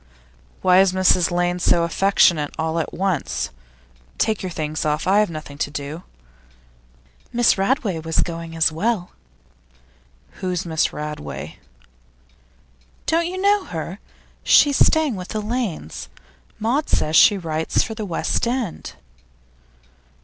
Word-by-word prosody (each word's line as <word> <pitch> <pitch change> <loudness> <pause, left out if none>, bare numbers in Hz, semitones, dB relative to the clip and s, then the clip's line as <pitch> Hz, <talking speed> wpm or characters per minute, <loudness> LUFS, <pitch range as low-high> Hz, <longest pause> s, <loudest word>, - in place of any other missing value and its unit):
'Why 185 0 +6
is 190 -1 +2
Mrs 185 -2 +3
Lane 175 0 0
so 170 -1 +3
affectionate 170 -3 +2
all 160 +1 -1
at 160 - -3
once? 185 -5 -2 0.7
Take 220 -2 0
your 185 - -4
things 155 -2 -3
off; 150 +1 -1
I 195 +2 +4
have 210 - +2
nothing 155 -3 -8
to - - -1
do.' 145 +3 -6 1.3
'Miss 240 -1 +3
Radway 200 - 0
was 160 0 0
going 165 -1 -5
as 160 0 +3
well.' 185 +2 -1 1.3
'Who's 180 -1 -2
Miss 160 -2 0
Radway?' 150 0 -6 1.5
'Don't 335 +1 +1
you 370 +1 -5
know 405 0 +2
her? 170 +3 -6 0.4
She's 285 -2 +5
staying 310 -9 +2
with 180 0 -7
the 215 - -3
Lanes. 210 - -4 0.5
Maud 250 +8 0
says 155 +1 +1
she 205 - +7
writes 160 -3 -1
for 225 - -5
The 220 0 -5
West 195 +4 -1
End. 240 -7 -3
180 Hz, 130 wpm, -21 LUFS, 160-215 Hz, 1.5 s, she